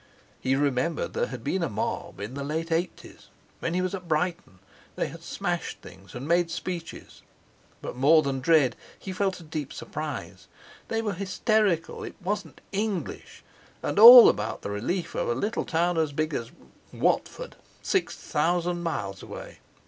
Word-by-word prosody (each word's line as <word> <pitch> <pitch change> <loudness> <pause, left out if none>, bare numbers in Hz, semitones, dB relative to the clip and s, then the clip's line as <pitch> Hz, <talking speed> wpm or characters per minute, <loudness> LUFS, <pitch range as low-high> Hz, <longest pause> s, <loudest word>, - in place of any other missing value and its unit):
He 130 +1 +1
remembered 140 +3 0
there 480 +1 0
had - - -8
been 190 - -1
a 165 - 0
mob 100 - -4
in 105 +5 -6
the 140 +1 -4
late 160 +3 -3
eighties, 165 +3 -3 0.3
when 165 - -2
he 185 - +1
was 185 - -2
at 185 -3 -6
Brighton; 160 - -1 0.4
they - - -1
had - - -11
smashed - - -3
things 95 +3 -14
and 130 +4 -6
made 170 0 +2
speeches. 170 0 -6 0.6
But - - -5
more 155 +5 +5
than 135 -2 -2
dread, 140 -4 +3 0.2
he 190 - -7
felt 190 0 -1
a - - -12
deep 155 -3 -5
surprise. 150 -3 -6 0.4
They 225 0 -1
were 210 -2 -1
hysterical—it 195 -1 0
wasn't 205 +2 -4
English! 205 -2 -4 0.4
And - - -1
all 240 +2 +12
about 105 +2 0
the - - -4
relief 145 - -2
of - - -1
a 120 - +1
little 210 - -2
town 170 +1 +1
as 155 -2 +1
big 155 +1 -1
as—Watford, 115 -3 -3 0.3
six - - 0
thousand 175 +3 0
miles 100 - -3
away. - - -9
165 Hz, 160 wpm, -26 LUFS, 140-185 Hz, 0.6 s, all